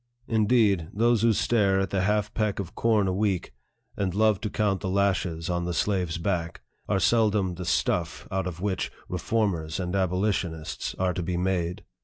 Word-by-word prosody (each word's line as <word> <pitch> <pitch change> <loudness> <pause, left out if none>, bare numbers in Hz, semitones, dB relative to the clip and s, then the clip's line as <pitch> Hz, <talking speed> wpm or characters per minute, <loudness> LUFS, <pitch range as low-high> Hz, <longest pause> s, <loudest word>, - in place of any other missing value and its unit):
Indeed, 105 -6 +2
those 115 +1 +2
who 115 0 +4
stare 100 -3 +2
at 95 - -1
the 95 - +1
half 105 +2 0
peck 105 -3 0
of 95 -4 -5
corn 110 -4 +2
a 95 - 0
week, 95 -5 -1 0.4
and 95 -2 -2
love 105 -2 +3
to 105 - -2
count 100 -3 0
the 95 - -2
lashes 95 -4 0
on 85 -1 -1
the 90 -1 -2
slave's 90 -4 0
back, 85 -2 -2 0.3
are 100 - +2
seldom 105 -3 +2
the 90 +1 -6
"stuff" 85 0 0
out 95 -1 -1
of 90 -1 -6
which 100 -2 -1 0.2
reformers 90 -3 -1
and 90 0 -2
abolitionists 90 -3 -1
are 95 -1 +1
to 90 - -3
be 90 +1 -2
made. 90 -1 -1
95 Hz, 180 wpm, -26 LUFS, 90-105 Hz, 0.4 s, who